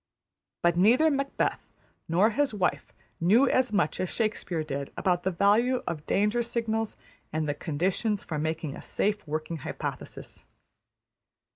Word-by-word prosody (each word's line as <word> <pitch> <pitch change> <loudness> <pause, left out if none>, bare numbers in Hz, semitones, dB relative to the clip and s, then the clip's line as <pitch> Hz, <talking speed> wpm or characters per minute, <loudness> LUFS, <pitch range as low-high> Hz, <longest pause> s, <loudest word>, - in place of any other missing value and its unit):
But 175 0 +4
neither 245 - +5
Macbeth 275 0 0 0.5
nor 185 +7 +3
his 270 0 +1
wife 185 -3 -1 0.3
knew 220 +11 +5
as 255 -1 +2
much 200 -8 +1
as 185 - -1
Shakespeare 210 -7 -1
did 140 -2 -4
about 180 -2 +1
the 190 - 0
value 210 +8 +3
of 150 -3 -4
danger 210 +4 +2
signals 225 -2 -2 0.3
and 155 0 -1
the 145 - 0
conditions 185 +8 -1
for 155 -3 -4
making 155 -2 -2
a - - -9
safe 205 -3 -1
working 155 +2 -3
hypothesis. 140 - -6
195 Hz, 140 wpm, -28 LUFS, 160-225 Hz, 0.5 s, neither